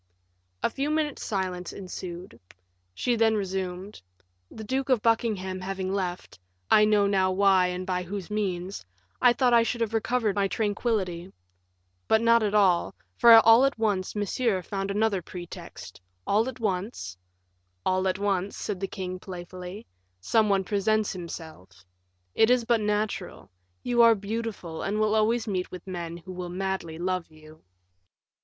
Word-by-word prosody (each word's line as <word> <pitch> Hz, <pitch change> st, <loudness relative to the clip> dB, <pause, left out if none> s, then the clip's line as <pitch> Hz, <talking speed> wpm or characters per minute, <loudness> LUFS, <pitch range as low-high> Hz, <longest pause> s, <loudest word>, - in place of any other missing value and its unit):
A -, -, +3 dB
few 280 Hz, +4 st, -2 dB
minutes' 305 Hz, -2 st, -1 dB
silence 185 Hz, -3 st, -3 dB
ensued. 180 Hz, -1 st, -8 dB, 0.6 s
She 245 Hz, -, 0 dB
then 225 Hz, -1 st, +3 dB
resumed: 190 Hz, 0 st, -4 dB, 0.5 s
"The 220 Hz, -, -9 dB
Duke 265 Hz, +5 st, -2 dB
of 250 Hz, -5 st, +2 dB
Buckingham 210 Hz, -5 st, 0 dB
having 190 Hz, 0 st, -3 dB
left 180 Hz, -, -4 dB, 0.3 s
I 210 Hz, -, +7 dB
now 210 Hz, -1 st, +3 dB
know 190 Hz, -2 st, +2 dB
why 190 Hz, -1 st, +4 dB
and 180 Hz, +1 st, -4 dB
by 180 Hz, -1 st, -1 dB
whose 190 Hz, +2 st, -6 dB
means 190 Hz, -, -3 dB, 0.4 s
I 245 Hz, -, +7 dB
thought 245 Hz, 0 st, +2 dB
I 235 Hz, -, +7 dB
should 230 Hz, +1 st, -1 dB
have 225 Hz, -1 st, -1 dB
recovered 225 Hz, -1 st, 0 dB
my 200 Hz, -1 st, +2 dB
tranquillity; 195 Hz, -4 st, -2 dB, 0.8 s
but 220 Hz, -, +4 dB
not 230 Hz, 0 st, +4 dB
at 210 Hz, -1 st, 0 dB
all, 190 Hz, -4 st, +3 dB, 0.2 s
for 235 Hz, -, +6 dB
all 230 Hz, +3 st, +7 dB
at 275 Hz, -2 st, +1 dB
once 205 Hz, -4 st, -1 dB
Monsieur 205 Hz, -1 st, 0 dB
found 195 Hz, +1 st, -4 dB
another 205 Hz, -1 st, +1 dB
pretext; 175 Hz, -, -10 dB, 0.2 s
all 220 Hz, +5 st, +2 dB
at 260 Hz, -, -10 dB
once 190 Hz, -, -3 dB, 0.4 s
" 90 Hz, 0 st, -46 dB
"All 185 Hz, 0 st, +1 dB
at 185 Hz, -, 0 dB
once," 200 Hz, -1 st, -1 dB
said 200 Hz, -3 st, -4 dB
the 195 Hz, -, -2 dB
king, 185 Hz, -1 st, -5 dB
playfully, 180 Hz, +2 st, -8 dB, 0.3 s
"some 215 Hz, -, +2 dB
one 195 Hz, -1 st, +3 dB
else 190 Hz, -, -11 dB
presents 215 Hz, +1 st, +1 dB
himself. 160 Hz, -, -9 dB, 0.5 s
It 220 Hz, -, +4 dB
is 250 Hz, -2 st, +3 dB
but 230 Hz, -1 st, +2 dB
natural; 210 Hz, -, -2 dB, 0.3 s
you 240 Hz, -1 st, +3 dB
are 230 Hz, -1 st, +7 dB
beautiful, 205 Hz, -5 st, -5 dB
and 210 Hz, +2 st, -1 dB
will 215 Hz, 0 st, +2 dB
always 220 Hz, +2 st, +2 dB
meet 185 Hz, -3 st, -2 dB
with 180 Hz, -, -9 dB
men 170 Hz, -3 st, -5 dB
who 180 Hz, +2 st, -10 dB
will 180 Hz, -1 st, -6 dB
madly 185 Hz, -3 st, -3 dB
love 180 Hz, 0 st, -2 dB
you." 155 Hz, 0 st, -17 dB
195 Hz, 160 wpm, -27 LUFS, 180-220 Hz, 0.8 s, I